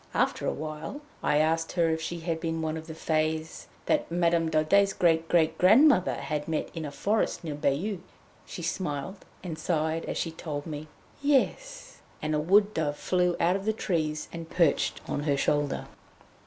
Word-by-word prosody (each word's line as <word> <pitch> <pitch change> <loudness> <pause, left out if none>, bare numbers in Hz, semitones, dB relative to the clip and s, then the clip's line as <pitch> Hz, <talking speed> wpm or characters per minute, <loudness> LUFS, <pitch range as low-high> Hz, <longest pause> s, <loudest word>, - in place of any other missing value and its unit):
After - - +1
awhile 155 - -4 0.2
I 150 - +2
asked 165 +1 +1
her 170 -2 +2
if 160 0 -1
she 170 +1 -4
had 165 -1 -2
been 165 -1 -2
one 155 0 -1
of 160 0 -7
the 160 - -7
Fées 160 0 -1 0.2
that - - +1
Madame 170 -1 +2
Daudet's 195 +6 +3
great 165 -2 +2
great 160 -2 +2
grandmother 215 - +6
had 150 -1 -3
met 160 -1 -2
in 165 -2 -4
a 145 - -5
forest 205 +8 0
near 155 -3 -3
Bayeux. 150 +8 -1 0.5
She 175 - -7
smiled 170 +1 -3 0.2
and 165 -4 -5
sighed 160 0 -1
as - - -3
she 165 - -2
told 150 -3 -5
me 155 -1 -6 0.3
"Yes," - - 0 0.2
and 155 0 -2
a 150 - +2
wood 200 +6 +4
dove 150 -2 -1
flew 180 -1 +1
out 175 +2 +3
of 195 0 -4
the 220 - +2
trees 155 -7 -2
and 165 -1 -7
perched 170 -6 +1
on - - -2
her 140 -2 +2
shoulder. 145 0 0
165 Hz, 180 wpm, -28 LUFS, 155-180 Hz, 0.5 s, grandmother